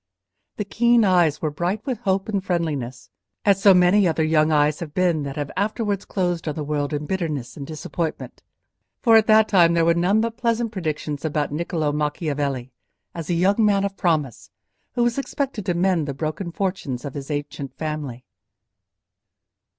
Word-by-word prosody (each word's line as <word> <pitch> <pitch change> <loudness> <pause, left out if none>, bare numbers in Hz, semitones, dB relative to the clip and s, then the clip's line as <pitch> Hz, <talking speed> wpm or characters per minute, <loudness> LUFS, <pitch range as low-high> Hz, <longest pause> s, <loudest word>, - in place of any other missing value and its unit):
The 210 - -2
keen 235 +2 +3
eyes 175 -6 +3
were 155 - 0
bright 180 +8 -2
with 255 -5 -2
hope 195 -4 0
and 200 -3 -1
friendliness, 145 -9 -3 0.3
as 195 -2 +3
so 200 - +7
many 180 +2 +5
other 160 -1 +1
young 155 0 +3
eyes 150 0 +2
have 155 -3 -7
been 175 -4 +2
that 140 -1 -5
have 145 -1 -4
afterwards 205 0 -1
closed 175 -4 -2
on 150 - -2
the 155 - -3
world 145 0 -2
in 150 0 -3
bitterness 155 -8 -3
and 140 -2 -7
disappointment; 160 +1 -5 0.6
for 230 -2 +6
at 220 -1 +5
that 220 0 +6
time 170 -5 +4
there 165 -1 +3
were 170 - +4
none 180 +5 +2
but 230 0 -2
pleasant 230 -1 0
predictions 155 -6 -4
about 150 -2 -1
Niccolò 155 -1 -1
Macchiavelli, 145 -4 -2 0.4
as 165 -1 -6
a 175 - +1
young 195 +6 +3
man 200 -2 +3
of 200 -1 -4
promise, 155 - -1 0.4
who 240 - +1
was 240 +2 +1
expected 265 -7 -3
to 180 - +1
mend 175 -3 +1
the 140 - -4
broken 160 +4 -4
fortunes 170 -10 -3
of 140 - -5
his 140 -1 -7
ancient 145 -2 -5
family. 150 -6 -5
170 Hz, 180 wpm, -23 LUFS, 150-200 Hz, 0.6 s, so